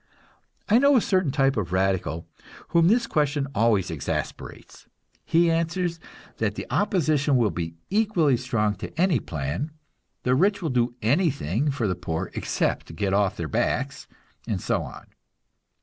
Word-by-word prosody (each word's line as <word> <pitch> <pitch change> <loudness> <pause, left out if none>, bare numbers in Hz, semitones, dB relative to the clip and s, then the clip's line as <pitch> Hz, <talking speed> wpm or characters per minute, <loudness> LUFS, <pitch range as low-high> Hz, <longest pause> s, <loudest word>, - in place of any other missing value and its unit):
I 220 +3 +5
know 280 +1 +5
a - - +7
certain 185 -7 +1
type 135 0 +2
of 90 -5 -2
radical 95 -4 0 0.4
whom 170 0 +4
this 230 +4 +3
question 145 -7 0
always 105 -5 +2
exasperates. 75 -4 -5 0.4
He 170 0 +3
answers 165 +1 -1 0.4
that - - -1
the - - -5
opposition 155 -9 +2
will 115 -5 +2
be 85 -2 -4 0.2
equally 195 - +3
strong 115 -4 0
to - - -8
any 175 -7 +3
plan; 75 - -3 0.5
the 125 - +2
rich 195 +9 +3
will 165 -6 -2
do 120 -1 +1
anything 140 - +1
for 135 -6 -1
the 95 - +1
poor 85 0 -4
except 80 - -2
get 95 +3 -1
off 100 -1 +2
their 80 - -3
backs - - -1 0.4
and - - -1
so - - 0
on. - - -9
135 Hz, 150 wpm, -25 LUFS, -, 0.5 s, a